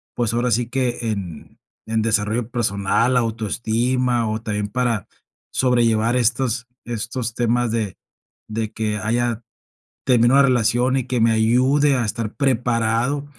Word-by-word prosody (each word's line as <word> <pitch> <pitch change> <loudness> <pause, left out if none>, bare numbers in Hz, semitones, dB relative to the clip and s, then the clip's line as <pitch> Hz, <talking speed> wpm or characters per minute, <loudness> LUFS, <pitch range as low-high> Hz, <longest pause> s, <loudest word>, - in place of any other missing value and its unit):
pues, 115 -2 -1
ahora 120 +1 0
sí 120 0 +1
que 125 -2 -1
en 90 -7 -7 0.3
en 110 0 0
desarrollo 110 +1 0
personal, 115 +1 +1
la 125 - +4
autoestima, 115 +2 0
o 110 +1 -3
también 105 -2 -2
para 120 -6 -1 0.5
sobrellevar 120 -2 +2
estos 120 0 0 0.2
estos 120 0 -4
temas 120 0 +1
de 110 -5 -2 0.5
de 110 0 -3
que 105 -1 -2
haya 115 +1 -1 0.6
terminado 125 +2 +5
la 135 - +4
relación 125 +1 +2
y 130 - 0
que 125 -2 -1
me 115 0 +4
ayude 130 +6 +3
a 120 - 0
estar 105 +1 -3
preparado 125 +1 0
115 Hz, 140 wpm, -21 LUFS, 110-125 Hz, 0.6 s, terminado